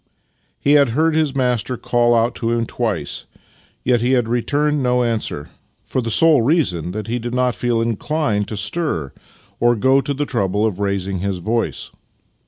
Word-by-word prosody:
He 140 Hz, -, +1 dB
had 145 Hz, -3 st, +5 dB
heard 160 Hz, +1 st, +3 dB
his 155 Hz, -3 st, +1 dB
master 125 Hz, -2 st, 0 dB
call 120 Hz, 0 st, +2 dB
out 115 Hz, +1 st, +2 dB
to 115 Hz, -, -2 dB
him 115 Hz, 0 st, 0 dB
twice, 105 Hz, -12 st, -3 dB, 0.6 s
yet 120 Hz, -2 st, +2 dB
had 125 Hz, -1 st, +2 dB
returned 145 Hz, +5 st, 0 dB
no 125 Hz, -1 st, +2 dB
answer, 110 Hz, -11 st, -2 dB, 0.3 s
for 130 Hz, -, -2 dB
the 115 Hz, -, -3 dB
sole 155 Hz, +3 st, +5 dB
reason 115 Hz, -, +1 dB
that 105 Hz, +3 st, -5 dB
he 120 Hz, +2 st, -2 dB
did 120 Hz, +1 st, -4 dB
not 125 Hz, -1 st, +2 dB
feel 120 Hz, -1 st, 0 dB
inclined 115 Hz, -1 st, -1 dB
to 110 Hz, -, -5 dB
stir 105 Hz, -, -2 dB, 0.5 s
or 120 Hz, 0 st, +3 dB
to -, -, -7 dB
go 135 Hz, +4 st, +4 dB
to 140 Hz, +1 st, -3 dB
the 145 Hz, +2 st, -1 dB
trouble 105 Hz, -5 st, 0 dB
of 105 Hz, -4 st, -2 dB
raising 100 Hz, -2 st, -1 dB
his 95 Hz, 0 st, -2 dB
voice. 115 Hz, +6 st, -2 dB
120 Hz, 180 wpm, -19 LUFS, 105-135 Hz, 0.6 s, had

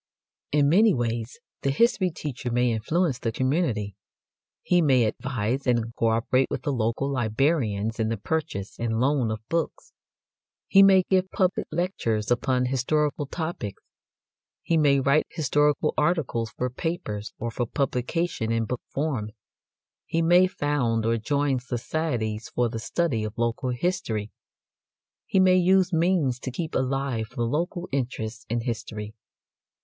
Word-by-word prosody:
In 145 Hz, -1 st, +3 dB
many 200 Hz, +6 st, +5 dB
ways 115 Hz, 0 st, -3 dB, 0.2 s
the 140 Hz, -, 0 dB
history 185 Hz, -, +3 dB
teacher 140 Hz, -6 st, -5 dB
may 120 Hz, 0 st, +2 dB
influence 135 Hz, +6 st, 0 dB
the 115 Hz, -, -1 dB
community. 125 Hz, -, 0 dB, 0.7 s
He 175 Hz, -1 st, +3 dB
may 130 Hz, -6 st, +4 dB
advise 120 Hz, +3 st, -2 dB
and 115 Hz, -2 st, +1 dB
co 115 Hz, -, +1 dB
operate 115 Hz, +4 st, +2 dB
with -, -, -4 dB
the 145 Hz, -, 0 dB
local 115 Hz, +3 st, 0 dB
librarians 115 Hz, -4 st, 0 dB
in 110 Hz, -1 st, +1 dB
the 115 Hz, -, -1 dB
purchase 105 Hz, -5 st, -3 dB
and 115 Hz, -1 st, -1 dB
loan 130 Hz, -2 st, +2 dB
of 110 Hz, 0 st, -5 dB
books; 170 Hz, -, -3 dB, 0.7 s
he 195 Hz, -, +6 dB
may 195 Hz, -1 st, +7 dB
give 185 Hz, 0 st, +1 dB
public 185 Hz, -1 st, 0 dB
lectures 125 Hz, -, -1 dB
upon 125 Hz, +1 st, +2 dB
historical 145 Hz, +3 st, 0 dB
topics; 160 Hz, -, -5 dB, 0.8 s
he 165 Hz, -, +1 dB
may 145 Hz, -3 st, +4 dB
write 140 Hz, +3 st, +2 dB
historical 150 Hz, -2 st, +1 dB
articles 150 Hz, -8 st, 0 dB
for 125 Hz, 0 st, -1 dB
papers 125 Hz, -9 st, -4 dB
or 115 Hz, 0 st, -4 dB
for 120 Hz, +1 st, -2 dB
publication 130 Hz, 0 st, -1 dB
in 115 Hz, 0 st, +1 dB
book 125 Hz, +2 st, -4 dB
form; 135 Hz, -8 st, -1 dB, 0.8 s
he 165 Hz, 0 st, 0 dB
may 175 Hz, +2 st, +6 dB
found 130 Hz, -9 st, 0 dB
or 115 Hz, 0 st, +1 dB
join 140 Hz, +3 st, 0 dB
societies 120 Hz, -3 st, -3 dB
for 120 Hz, -1 st, 0 dB
the 115 Hz, 0 st, -5 dB
study 130 Hz, -2 st, -1 dB
of 110 Hz, 0 st, -5 dB
local 120 Hz, +2 st, -1 dB
history; 125 Hz, -, -2 dB, 1.0 s
he 190 Hz, -, +2 dB
may 185 Hz, -1 st, +5 dB
use 185 Hz, 0 st, +3 dB
means 165 Hz, -7 st, +2 dB
to 130 Hz, -, -5 dB
keep 155 Hz, +6 st, -4 dB
alive 130 Hz, -3 st, -1 dB
the 120 Hz, -, -1 dB
local 170 Hz, -, -2 dB
interest 120 Hz, -4 st, -3 dB
in 120 Hz, +1 st, 0 dB
history. 110 Hz, -3 st, -5 dB
130 Hz, 145 wpm, -26 LUFS, 115-160 Hz, 1.0 s, may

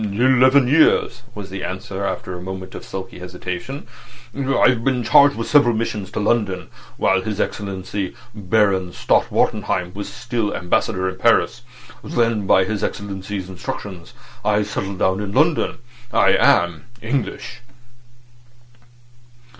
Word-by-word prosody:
"Eleven 130 Hz, +5 st, +4 dB
years," 150 Hz, -3 st, +3 dB
was 100 Hz, -3 st, -8 dB
the 95 Hz, -1 st, -5 dB
answer, 95 Hz, +1 st, -5 dB
after 95 Hz, -1 st, -3 dB
a 90 Hz, -, -7 dB
moment 95 Hz, 0 st, -7 dB
of -, -, -8 dB
sulky 95 Hz, -2 st, -7 dB
hesitation. 90 Hz, +9 st, -6 dB, 0.5 s
"I've 130 Hz, -3 st, +2 dB
been 130 Hz, -2 st, +1 dB
charged 140 Hz, +4 st, +6 dB
with 115 Hz, -, -4 dB
several 120 Hz, -6 st, +4 dB
missions 105 Hz, -3 st, -3 dB
to -, -, -2 dB
London 105 Hz, -4 st, 0 dB, 0.3 s
while 95 Hz, 0 st, +2 dB
His 105 Hz, +1 st, -4 dB
Excellency 95 Hz, -1 st, -3 dB, 0.2 s
Baron 95 Hz, -3 st, +1 dB
Stott -, -, +1 dB
Wartenheim 90 Hz, 0 st, 0 dB
was 100 Hz, -6 st, -6 dB
still 105 Hz, -, -2 dB
Ambassador 95 Hz, +2 st, 0 dB
in 95 Hz, 0 st, -4 dB
Paris. -, -, +2 dB, 0.4 s
Then 115 Hz, -4 st, 0 dB
by 95 Hz, -, +5 dB
his 100 Hz, +2 st, -3 dB
Excellency's 100 Hz, -1 st, -4 dB
instructions 95 Hz, -3 st, -7 dB, 0.3 s
I 105 Hz, 0 st, +2 dB
settled 100 Hz, -2 st, -4 dB
down 95 Hz, +1 st, +1 dB
in 100 Hz, -1 st, -4 dB
London. 155 Hz, +5 st, +2 dB, 0.3 s
I -, -, +4 dB
am 85 Hz, -2 st, +3 dB, 0.2 s
English." 125 Hz, 0 st, -3 dB
100 Hz, 130 wpm, -20 LUFS, 95-115 Hz, 0.5 s, charged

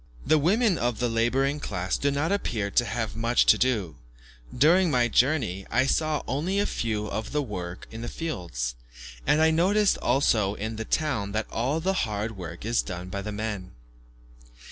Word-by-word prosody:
The 155 Hz, +1 st, +4 dB
women 195 Hz, +5 st, +2 dB
of 120 Hz, -2 st, 0 dB
the 120 Hz, -, 0 dB
labouring 130 Hz, +5 st, +1 dB
class 95 Hz, -7 st, -2 dB
do 140 Hz, -, +1 dB
not 145 Hz, +5 st, 0 dB
appear 110 Hz, -, -1 dB
to 120 Hz, -, +3 dB
have 110 Hz, -1 st, -3 dB
much 115 Hz, +2 st, +2 dB
to -, -, +7 dB
do; 105 Hz, -, 0 dB, 0.5 s
during 170 Hz, +8 st, +4 dB
my 125 Hz, -4 st, +3 dB
journey, 120 Hz, -, +1 dB
I 120 Hz, +4 st, +2 dB
saw 155 Hz, +1 st, 0 dB
only 160 Hz, +9 st, -1 dB
a 205 Hz, -, +2 dB
few 110 Hz, -, -2 dB
at 110 Hz, -, -3 dB
work 95 Hz, -11 st, -4 dB
in 115 Hz, -, -7 dB
the 120 Hz, -, -4 dB
fields, 85 Hz, -, -4 dB, 0.5 s
and 150 Hz, -, +4 dB
I 160 Hz, 0 st, +5 dB
noticed 195 Hz, +5 st, +3 dB
also 110 Hz, -6 st, +2 dB
in 110 Hz, +2 st, -4 dB
the 115 Hz, -, -4 dB
town 110 Hz, -12 st, -1 dB
that 110 Hz, 0 st, -1 dB
all 130 Hz, +7 st, 0 dB
the 190 Hz, +4 st, 0 dB, 0.2 s
hard 105 Hz, +2 st, -3 dB
work 85 Hz, 0 st, -8 dB
is 115 Hz, +1 st, +2 dB
done 90 Hz, -1 st, -6 dB
by 100 Hz, +1 st, -4 dB
the 105 Hz, +2 st, -5 dB
men. 105 Hz, -3 st, -4 dB
120 Hz, 180 wpm, -26 LUFS, 105-150 Hz, 0.5 s, to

